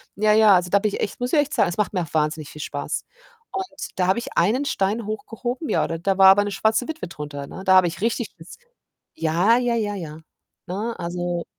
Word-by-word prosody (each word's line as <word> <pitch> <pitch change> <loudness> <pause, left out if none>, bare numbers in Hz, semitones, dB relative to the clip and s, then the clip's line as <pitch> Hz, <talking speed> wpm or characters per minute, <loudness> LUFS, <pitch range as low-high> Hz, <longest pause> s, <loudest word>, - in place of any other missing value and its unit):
Ja, 210 +1 +2
ja, 215 -3 +6
also 180 0 +1
da 200 - +5
habe 215 +1 +1
ich 205 - -3
echt 205 - -3
muss 245 +4 -3
ich 300 - +5
echt 290 +1 0
sagen, - - +3
es 175 - -4
macht 210 -3 0
mir 180 - 0
auch 160 - -7
wahnsinnig 155 -1 -1
viel 150 - -9
Spaß 145 -1 -4 0.5
und 370 - -6
da 180 - +2
habe 190 +5 +2
ich - - -8
einen 225 +11 +3
Stein 205 -1 -1
hochgehoben 240 +6 -4
ja, - - +2
da 175 +4 -1
war 190 - +9
aber 205 +1 +6
'ne 205 - -3
schwarze 220 +4 +1
Witwe 320 - -5
drunter, 145 -3 -7
ne? 190 - -9
Da 190 - +5
habe 185 -2 +6
ich 165 - -5
richtig 230 0 -1
Schiss 165 +2 -13
g 485 - -32 0.5
Ja, 175 +9 +3
ja, 245 -1 +1
ja, 205 -2 -1
ja, 160 -4 -7 0.5
ne? 210 +6 -3
Also 175 0 -3
195 Hz, 240 wpm, -23 LUFS, 175-230 Hz, 0.5 s, war